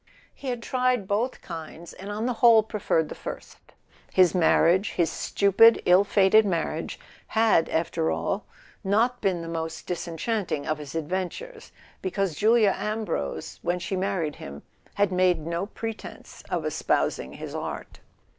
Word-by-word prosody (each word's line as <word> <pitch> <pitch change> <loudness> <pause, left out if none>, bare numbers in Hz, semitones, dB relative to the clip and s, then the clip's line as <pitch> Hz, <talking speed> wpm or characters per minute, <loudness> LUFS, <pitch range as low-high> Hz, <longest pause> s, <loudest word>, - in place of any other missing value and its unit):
He 275 - -10
had 245 -2 -3
tried 250 -5 0
both 220 +6 -1
kinds, 165 0 -8
and 195 +2 -9
on 210 +2 -3
the 250 - 0
whole 230 -2 +7
preferred 200 -7 0
the - - -7
first. - - -8 0.5
His 180 -3 +4
marriage, 180 +2 +3
his 170 -3 +1
stupid 205 +6 +4
ill 180 +2 +6
fated 200 +1 +4
marriage, 165 -4 -2 0.3
had 220 -7 +3
after 165 0 0
all 200 +2 -2 0.4
not 225 +5 +1
been 185 -4 0
the - - -7
most 165 -1 -5
disenchanting 175 -2 -3
of 155 -1 -2
his 150 +1 -8
adventures, 185 - -4 0.3
because 190 -1 -1
Julia 215 +3 +4
Ambrose, 210 - -3
when 175 +1 0
she 180 +2 -4
married 185 -5 -2
him, 70 +1 -9 0.3
had 205 -1 +2
made 180 -4 +2
no 170 +4 -2
pretense 225 0 -8
of - - -2
espousing - - -1
his - - -8
art. - - -6
190 Hz, 145 wpm, -26 LUFS, 165-220 Hz, 0.5 s, whole